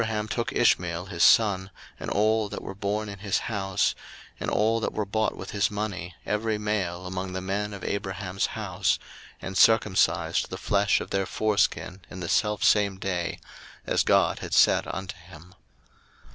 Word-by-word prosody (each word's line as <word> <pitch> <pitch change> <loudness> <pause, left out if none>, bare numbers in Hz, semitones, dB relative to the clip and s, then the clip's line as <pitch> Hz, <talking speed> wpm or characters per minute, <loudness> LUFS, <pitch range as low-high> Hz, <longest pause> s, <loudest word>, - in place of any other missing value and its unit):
01:017:023 115 - -1
And - - -2
Abraham 105 0 -2
took 120 - -2
Ishmael 90 -7 +2
his 90 -3 -1
son, 100 -3 +4 0.3
and - - -5
all 110 0 +2
that - - -6
were - - -6
born 105 +2 -2
in 100 -1 -8
his 100 -1 0
house, 95 -3 0 0.5
and - - -2
all 110 +2 +2
that - - -2
were 105 - -1
bought 110 +2 -1
with - - -7
his 100 -1 +1
money, 100 -4 -4
every 105 +1 -1
male 95 -4 -2
among 95 0 -4
the 95 - -2
men 100 +3 -2
of 100 - -8
Abraham's 95 -1 -2
house; 100 -2 0 0.5
and 95 - -5
circumcised 95 -6 +3
the 95 - -5
flesh 100 0 +2
of - - -8
their 95 -1 0
foreskin 100 -3 0
in 95 - -8
the 85 -2 -4
selfsame 105 -2 +2
day, 90 -3 -3 0.5
as - - +2
God - - +3
had - - -3
said - - +5
unto 95 -1 -5
him. 90 0 -15
100 Hz, 175 wpm, -26 LUFS, 95-105 Hz, 0.5 s, said